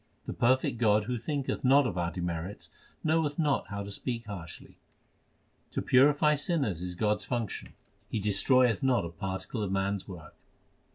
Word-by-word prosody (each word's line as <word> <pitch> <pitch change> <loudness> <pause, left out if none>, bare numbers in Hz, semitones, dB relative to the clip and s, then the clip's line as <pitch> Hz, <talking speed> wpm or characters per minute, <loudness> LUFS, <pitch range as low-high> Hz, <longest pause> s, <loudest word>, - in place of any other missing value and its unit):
The - - -4
perfect 125 -1 +2
God 105 -3 +4
who 120 +2 -3
thinketh 140 +2 -3
not 135 +2 +5
of 115 - -2
our 85 -1 0
demerits, 85 +2 -5 0.3
knoweth 160 -2 +1
not 150 -4 +1
how 100 -1 -4
to 100 - -7
speak 115 +3 -4
harshly. 90 -6 -9 0.9
To - - -1
purify 145 +3 +5
sinners 145 - 0
is 90 0 -4
God 105 +3 +1
s - - -9
function; 120 -5 -4 0.3
He 110 - -1
destroyeth 115 +4 +3
not 130 -9 +2
a - - -4
particle 95 +5 -5
of 100 -2 -2
man 95 +1 +1
s 95 - -12
work. 90 -6 -10
110 Hz, 170 wpm, -29 LUFS, 95-130 Hz, 0.9 s, not